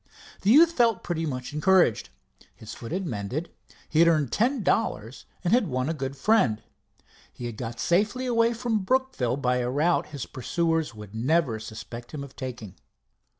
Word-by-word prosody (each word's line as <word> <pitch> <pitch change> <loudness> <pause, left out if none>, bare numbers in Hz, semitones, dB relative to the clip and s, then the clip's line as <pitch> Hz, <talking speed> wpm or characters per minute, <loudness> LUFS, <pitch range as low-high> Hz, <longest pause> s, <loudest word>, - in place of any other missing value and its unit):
The 195 - +1
youth 320 +8 +7
felt 235 - +2
pretty 165 -2 -2
much 130 0 -5
encouraged. 175 - +3 0.5
His 110 - -10
foot 115 - -9
had 190 +2 -2
mended, 125 - -4 0.4
he 155 - 0
had 170 - +7
earned 155 -7 +2
ten 240 - +1
dollars, 120 - -1 0.2
and 180 +3 +1
had 240 -5 +3
won 130 0 -1
a - - 0
good 135 -3 -4
friend. 130 - +2 0.7
He 120 - -8
had 120 -2 -5
got 115 +1 -6
safely 205 - +1
away 230 -1 +2
from 230 -2 0
Brookville 205 - 0
by 125 -2 +1
a 125 -1 -1
route 155 +7 +1
his 145 -4 -6
pursuers 160 0 -1
would 105 -1 -11
never 125 0 +1
suspect 115 +4 -9
him 140 - -5
of 140 -1 -12
taking. 115 -7 -7
150 Hz, 175 wpm, -26 LUFS, 120-195 Hz, 0.7 s, youth